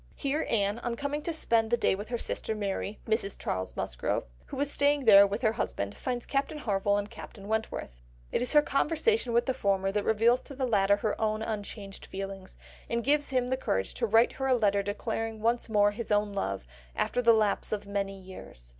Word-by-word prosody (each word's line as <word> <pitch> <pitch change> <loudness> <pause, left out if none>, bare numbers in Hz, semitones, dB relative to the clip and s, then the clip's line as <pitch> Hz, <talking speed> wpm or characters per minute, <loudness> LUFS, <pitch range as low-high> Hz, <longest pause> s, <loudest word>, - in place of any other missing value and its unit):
Here 290 +2 -1
Anne, 205 0 +1
on 240 -1 -3
coming 285 +4 -3
to 335 - -2
spend 230 -8 +1
the 240 - +3
day 230 - +2
with 205 +3 -5
her 240 - -1
sister 220 - -3
Mary, 205 0 -3
Mrs. 220 -3 0
Charles 95 0 -3
Musgrove, - - -2 0.2
who - - -6
is 285 0 +1
staying 285 -1 +2
there 200 -2 +9
with 205 +5 -4
her 220 - +4
husband, 100 - -3
finds 245 -2 -3
Captain 275 +2 -1
Harville 205 -6 +1
and 205 0 -2
Captain 210 -2 -11
Wentworth. 220 - -3 0.3
It - - 0
is 250 - 0
her 295 -1 +7
conversation 320 - +1
with 235 +1 +3
the 260 - 0
former 195 -3 0
that 205 0 0
reveals 230 +3 +3
to 280 - -11
the 260 0 -1
latter 200 -4 +3
her 215 +1 -2
own 215 0 0
unchanged 205 -2 -6
feelings, 195 -1 -7 0.3
and 235 0 -1
gives 290 +3 +2
him 255 -2 0
the 260 - +1
courage 95 - -1
to 235 - -1
write 225 +3 +5
her 270 - -3
a 260 - +4
letter 200 -4 +2
declaring 220 +2 -3
once 235 +2 +1
more 205 -1 +4
his 220 +1 -6
own 205 0 +2
love, 100 - -2 0.3
after 245 - 0
the 235 -1 +6
lapse 215 -2 +1
of 210 -1 -2
many 200 -1 -3
years. 185 - -11
220 Hz, 210 wpm, -29 LUFS, 200-245 Hz, 0.3 s, there